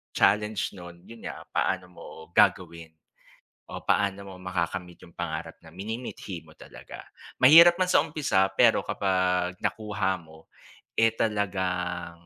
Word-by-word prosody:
challenge 105 0 +2
nun 85 -2 -12
yun 115 0 -13
nga - - -8
paano 90 +1 -1
mo - - -13 0.3
gagawin 85 -2 +1 0.7
o - - -8
paano 100 -1 0
mo - - -9
makakamit 90 -1 -4
yung 85 - -17
pangarap 85 -2 -5
na 80 - -14
minimithi 100 -4 -7
mo 80 - -17
talaga. - - -12 0.3
Mahirap 165 +6 +9
man 185 - +2
sa 155 - +4
umpisa 145 -11 +1
pero - - +4
kapag 90 -2 0
nakuha 105 -3 -2
mo 80 0 -17 0.5
eh, 115 0 +4
talagang 90 -5 -2
95 Hz, 130 wpm, -26 LUFS, 85-105 Hz, 0.7 s, Mahirap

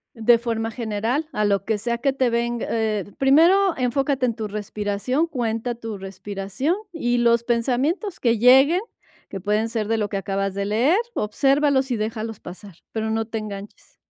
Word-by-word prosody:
De 230 +1 +4
forma 225 -1 -2
general, 230 +6 -2
a 210 - 0
lo 200 -2 +1
que 220 -1 0
sea 235 +3 -2
que 270 +3 0
te 260 -2 +1
venga, 235 0 -1
eh, 220 -3 0
primero 335 +8 +4
enfócate 265 +1 0
en 235 - 0
tu 215 -1 -5
respiración, 210 +7 -2
cuenta 240 -4 -2
tu 225 -3 -6
respiración 195 - -3 0.2
y 245 -6 0
los 235 -1 +3
pensamientos 260 - -1
que 235 -2 +2
lleguen, 265 - +6 0.5
que 195 -2 -7
pueden 210 +3 0
ser 220 -2 -3
de 225 - +2
lo 210 -1 0
que 200 - -6
acabas 195 0 -2
de 200 - -2
leer, 240 - +2 0.2
obsérvalos 270 +4 +2
y 235 - 0
déjalos 220 0 -4
pasar, 185 +1 -11 0.2
pero 220 0 -2
no 225 0 0
te 225 0 -4
enganches. 205 -1 -9
230 Hz, 175 wpm, -23 LUFS, 210-255 Hz, 0.5 s, lleguen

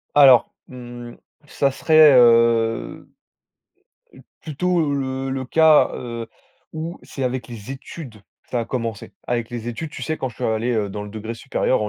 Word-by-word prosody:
Alors, 135 -5 +7 0.2
mmh, 120 -1 -10 0.3
ça 140 -1 0
serait, 155 +1 +6
heu, 115 -1 +3 1.1
p - - -16 0.2
plutôt 160 0 -1
le 135 -1 -3
le 130 0 -3
cas, 160 +3 +5
heu, 115 -2 -6 0.5
où 160 +2 -6
c'est 135 - -6
avec 125 -2 -3
les 115 0 -9
études 135 -1 -9 0.3
que - - -36
ça 120 - -1
a - - -3
commencé. 115 -3 -5
Avec 120 -2 -2
les 120 -1 -6
études, 145 +6 -5
tu - - -9
sais, 155 - -2
quand 130 - -3
je 115 - -14
suis - - -5
allé, 110 +2 0
heu, 110 -3 -1
dans 105 +1 -6
le 105 - -8
degré 110 +2 -6
supérieur 130 0 -1
en 105 - -2
125 Hz, 175 wpm, -21 LUFS, 115-140 Hz, 1.1 s, Alors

